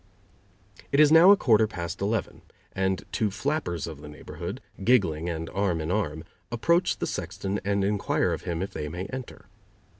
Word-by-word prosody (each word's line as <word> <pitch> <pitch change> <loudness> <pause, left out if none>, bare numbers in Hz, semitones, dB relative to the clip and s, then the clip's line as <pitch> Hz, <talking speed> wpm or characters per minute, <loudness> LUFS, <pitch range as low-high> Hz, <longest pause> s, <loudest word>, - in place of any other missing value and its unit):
It 140 - +2
is 150 -1 +7
now 165 +4 +8
a 200 - +8
quarter 110 - +4
past 85 -4 -6
eleven, 105 -2 -2 0.3
and 95 0 -1
two 110 - 0
flappers 105 - -2
of 80 -3 -8
the 75 - -9
neighborhood, 75 - -7 0.2
giggling 90 -9 +2
and 80 -1 -4
arm 95 -4 0
in 80 +2 -3
arm, 80 -7 -1 0.3
approach 170 +10 +2
the - - -2
sexton 100 +1 -3
and 100 0 0
inquire 100 0 +1
of - - -4
him 85 0 -3
if 100 - -5
they 75 - -4
may 90 +4 -5
enter. 130 -1 -7
100 Hz, 175 wpm, -26 LUFS, 85-115 Hz, 0.3 s, now